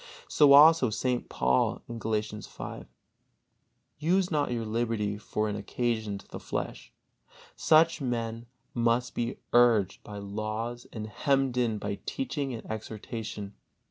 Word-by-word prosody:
So 145 -2 +6
also 150 -2 +8
St. 125 +3 -1
Paul, 65 0 +1 0.2
Galatians 105 -1 -2
v: - - -8 1.1
"Use 180 +4 +2
not 150 -2 +1
your 115 -2 -2
liberty 110 -2 -1
for 110 0 -2
an 105 - -2
occasion 110 -1 -2
to - - -15
the - - -8
flesh." - - -5 0.6
Such 160 0 +4
men 115 -2 -3 0.3
must 120 +1 +1
be 120 +1 -2 0.2
urged 115 -6 +4
by 105 - -8
laws 110 +4 -4
and 110 -2 -5
hemmed 135 +3 +1
in 120 -3 +1
by 100 0 -4
teaching 145 - -2
and 115 - -6
exhortation. 110 -1 -6
115 Hz, 130 wpm, -29 LUFS, 105-125 Hz, 1.1 s, also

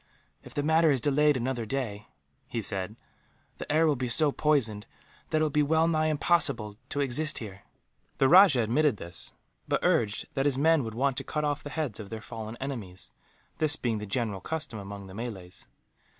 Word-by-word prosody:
"If - - -13
the 145 - 0
matter 160 +1 +4
is 135 -3 +3
delayed 145 +2 +3
another 120 -1 -2
day," 110 -4 -4 0.4
he 115 - -3
said, 95 -1 -2 0.6
"the - - -4
air 160 +2 +4
will 150 -2 +3
be 125 -1 -3
so 150 +4 +4
poisoned 120 -9 0 0.4
that 155 -1 +1
it - - +4
will 155 - 0
be 150 - +2
well 160 +2 +3
nigh 155 -1 +2
impossible 145 -9 +1
to 145 - -1
exist 140 +3 0
here." 100 -4 -7 0.6
The 135 - +4
rajah 175 -6 +7
admitted 135 +3 +2
this; 85 -1 -3 0.3
but - - +1
urged 105 -3 +1
that 135 +1 +1
his 135 -2 0
men 160 0 +4
would 110 -1 -6
want 135 +1 0
to - - -2
cut 150 0 -2
off 145 -1 -1
the 145 - -7
heads 145 -9 -3
of 105 -2 -8
their 110 - -5
fallen 110 +1 -7
enemies, 110 -10 -6 0.5
this 155 -2 +2
being 115 -6 -2
the 105 - -6
general 105 -3 -2
custom 155 - -4
among 100 0 -8
the 95 - -11
Malays. 95 -5 -7
130 Hz, 195 wpm, -28 LUFS, 110-150 Hz, 0.6 s, rajah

